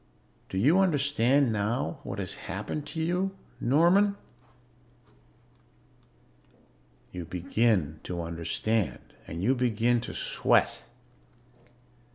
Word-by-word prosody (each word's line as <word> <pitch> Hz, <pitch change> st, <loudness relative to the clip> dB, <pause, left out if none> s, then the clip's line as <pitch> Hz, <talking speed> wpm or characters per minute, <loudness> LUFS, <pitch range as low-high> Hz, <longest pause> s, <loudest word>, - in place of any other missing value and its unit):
"Do 95 Hz, -, -4 dB
you 145 Hz, -, +4 dB
understand 140 Hz, -6 st, +3 dB
now 105 Hz, -6 st, -1 dB
what -, -, -6 dB
has -, -, -3 dB
happened 105 Hz, +10 st, -5 dB
to 160 Hz, -, -6 dB
you, 185 Hz, +3 st, -1 dB, 0.2 s
Norman?" 175 Hz, +10 st, +4 dB, 3.0 s
You 90 Hz, -1 st, -6 dB
begin 90 Hz, -2 st, 0 dB
to 85 Hz, -1 st, -4 dB
understand. 85 Hz, +6 st, -2 dB
And 85 Hz, +2 st, -5 dB
you 125 Hz, +6 st, +4 dB
begin 120 Hz, -1 st, +1 dB
to 120 Hz, -, -7 dB
sweat. -, -, +1 dB
115 Hz, 95 wpm, -28 LUFS, 95-145 Hz, 3.0 s, you